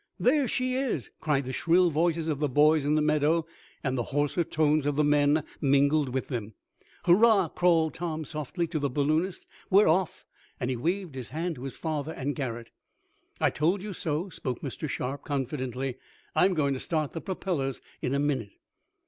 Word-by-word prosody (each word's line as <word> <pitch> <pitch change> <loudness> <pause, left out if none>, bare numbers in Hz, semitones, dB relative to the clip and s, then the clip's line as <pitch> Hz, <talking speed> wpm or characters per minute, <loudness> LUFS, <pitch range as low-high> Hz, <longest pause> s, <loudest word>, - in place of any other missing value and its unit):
"There 275 +1 +3
she 255 +2 0
is!" 255 - -2
cried 140 -3 0
the 130 - -4
shrill 175 +4 +3
voices 165 +1 +1
of 150 -3 -1
the 150 -1 +1
boys 150 +2 +4
in 150 +1 +2
the 155 - +2
meadow, 155 +2 +2 0.4
and 130 -3 0
the 120 -3 -1
hoarser 145 +4 +1
tones 155 -2 +1
of 145 - 0
the 150 - +3
men 145 +1 +3 0.2
mingled 140 +1 +3
with 130 +1 -2
them. 110 -5 -5 0.5
"Hurrah!" 195 0 +5
called 165 -2 +2
Tom 160 -2 -4
softly 155 +4 -3
to 160 -2 -1
the 140 -1 0
balloonist. 155 +7 0 0.2
"We're 200 +2 +6
off!" 170 +1 +1 0.3
and 125 +1 -1
he - - -1
waved 175 +6 -2
his 130 -3 -6
hand 165 +5 -2
to 125 - -9
his 135 - -5
father 155 -1 -3
and 140 +2 -3
Garret. 120 -4 -4 0.7
"I - - +3
told 175 +6 +1
you 210 -1 -5
so," 165 +2 -2
spoke 130 -7 -5
Mr. 145 +2 -5
Sharp 130 +2 -3
confidently. 130 -2 -3 0.4
"I'm 185 0 +4
going 140 -3 +1
to 130 - -4
start 155 -1 -2
the 165 - -4
propellers 170 -8 -2 0.2
in 130 - -1
a - - +1
minute." 135 -8 -1
150 Hz, 185 wpm, -28 LUFS, 135-170 Hz, 0.7 s, We're